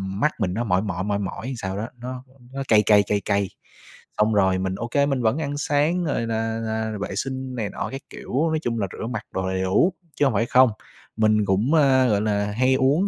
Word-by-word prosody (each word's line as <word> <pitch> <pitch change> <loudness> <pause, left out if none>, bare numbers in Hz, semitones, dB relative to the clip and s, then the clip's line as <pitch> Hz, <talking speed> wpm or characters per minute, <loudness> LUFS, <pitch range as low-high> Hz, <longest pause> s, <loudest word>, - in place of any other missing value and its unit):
mắt 150 +10 +2
mình 90 -4 0
nó 115 +5 -1
mỏi 95 -5 +1
mỏi, 95 -3 -3
mỏi 100 0 -1
mỏi 100 +3 -5
làm 130 - -3
sao 95 -2 -4
đó, 110 +2 -3
nó 125 +1 -7 0.3
nó 135 0 -3
cay 105 -1 +5
cay, 105 -1 +5
cay 100 0 -1
cay, 100 -2 +1 0.7
xong 105 +1 +3
rồi 95 -2 +3
mình, 95 0 -2
ô 120 - -4
kê, 140 +4 +2
mình 135 -3 0
vẫn 110 +4 +2
ăn 145 -2 -3
sáng 150 +5 +1
rồi 130 -6 -1
là 115 0 -1
là 110 -1 -2
vệ - - -4
sinh 130 -1 -4
này 110 -4 -2
nọ - - -4
các 135 +1 -6
kiểu. 140 +6 -2
Nói 160 0 0
chung 115 -1 -1
là 100 - 0
rửa - - -5
mặt 125 - -4
đồ 95 0 -2
đầy 95 0 -1
đủ, 95 - +3 0.2
chứ 145 - +2
hông 135 - +2
phải 115 +3 +1
không. 130 +1 +5 0.5
Mình 110 -1 +3
cũng, 100 +9 +1
a, 135 -4 +4
gọi 105 -3 +2
là, 105 -1 0
hay 130 +5 +2
uống 140 +9 +2
115 Hz, 245 wpm, -23 LUFS, 100-130 Hz, 0.7 s, cay